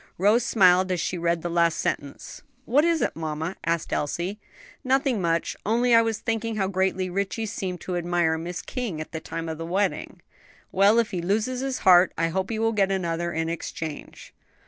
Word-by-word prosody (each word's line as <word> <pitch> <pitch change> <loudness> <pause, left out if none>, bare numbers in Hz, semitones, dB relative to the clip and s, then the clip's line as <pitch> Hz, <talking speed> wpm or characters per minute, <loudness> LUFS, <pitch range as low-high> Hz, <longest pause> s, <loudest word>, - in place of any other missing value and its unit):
Rose 210 +6 +3
smiled 185 -3 +4
as 180 - 0
she 160 - -2
read 170 0 0
the - - -1
last 170 -1 +2
sentence. 140 -1 -4 0.2
"What 275 +6 +3
is 335 -1 +2
it, - - -1
mamma?" 160 +2 -4
asked 165 0 -1
Elsie. 175 +7 -2 0.4
"Nothing 265 -4 +1
much; 170 -1 0
only 235 +3 +2
I 230 - +7
was 225 -1 -1
thinking 225 0 -2
how 195 -3 0
greatly 190 -1 0
Ritchie 200 +4 -2
seemed 185 -4 -4
to 180 - -4
admire 175 -2 +1
Miss 175 +2 -5
King 235 -11 -4
at 155 - -7
the 160 - -4
time 165 +1 -6
of 160 -1 -5
the - - -4
wedding." 195 +3 -2 0.5
"Well, 200 +4 +4
if 230 -2 +2
he 180 -3 -2
loses 215 +8 0
his 270 -1 -2
heart 180 -1 +6
I 165 0 +1
hope 190 +3 -2
he 225 - -2
will 225 +1 +1
get 195 -2 +2
another 170 -2 -1
in 165 0 -2
exchange." 160 -2 -6
185 Hz, 195 wpm, -25 LUFS, 170-220 Hz, 0.5 s, I